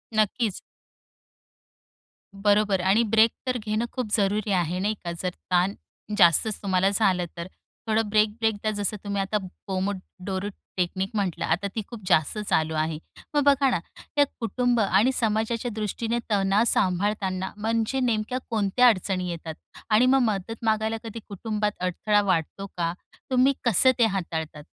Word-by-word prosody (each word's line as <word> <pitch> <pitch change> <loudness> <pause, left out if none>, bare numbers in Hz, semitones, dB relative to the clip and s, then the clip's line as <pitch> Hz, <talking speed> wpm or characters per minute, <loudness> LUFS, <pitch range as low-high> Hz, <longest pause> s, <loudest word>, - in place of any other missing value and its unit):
नक्कीच. 215 -1 +1 1.8
बरोबर. 205 -1 +2
आणि 195 +5 +3
ब्रेक 225 0 +5 0.2
तर 250 -1 +1
घेणं 215 +1 -2
खूप 250 -3 -3
जरुरी 205 +1 0
आहे, 180 -1 0
नाही 210 +3 0
का? 170 - -3
जर 185 - 0 0.2
ताण 180 +2 +3 0.4
जास्तच 190 +3 +4
तुम्हाला 190 -1 +2
झालं, 195 -3 +2
तर 170 +1 -5 0.4
थोडं 220 -1 +1
ब्रेक-ब्रेक 215 +1 +2
घ्या. 215 - 0
जसं 205 0 -2
तुम्ही 200 -1 -1
आता 205 +2 0 0.3
पोमोडोरो 190 0 -3 0.3
टेक्निक 185 +2 -1
म्हटलं, 195 -5 -1
आता 175 +5 0
ती 220 - -1
खूप 235 -3 -9
जास्त 160 +3 +2
चालू 160 -6 0
आहे. 155 0 -1 0.4
मग 290 - +4
बघा 280 -1 +4
ना, 240 - +1 0.4
या 290 - +6
कुटुंब 245 +1 0
आणि 205 +5 +3
समाजाच्या 225 +2 0
दृष्टीने 225 +2 -2
तणाव 195 +1 +3
सांभाळताना 190 -1 0
म्हणजे 225 +4 0
नेमक्या 235 0 0
कोणत्या 225 +3 +3
अडचणी 185 -4 +1
येतात? 165 -1 -5 0.4
आणि 220 +3 +5
मग 265 +1 +5
मदत 210 +4 -5
मागायला 220 0 +1
कधी 225 0 -7
कुटुंबात 210 +1 -2
अडथळा 205 +4 +1
वाटतो 190 +1 -1
का? 170 -1 0 0.4
तुम्ही 260 +1 +4
कसं 240 +3 +5
ते 230 - +6
हाताळतात? 160 -6 -3
205 Hz, 145 wpm, -25 LUFS, 185-225 Hz, 1.8 s, या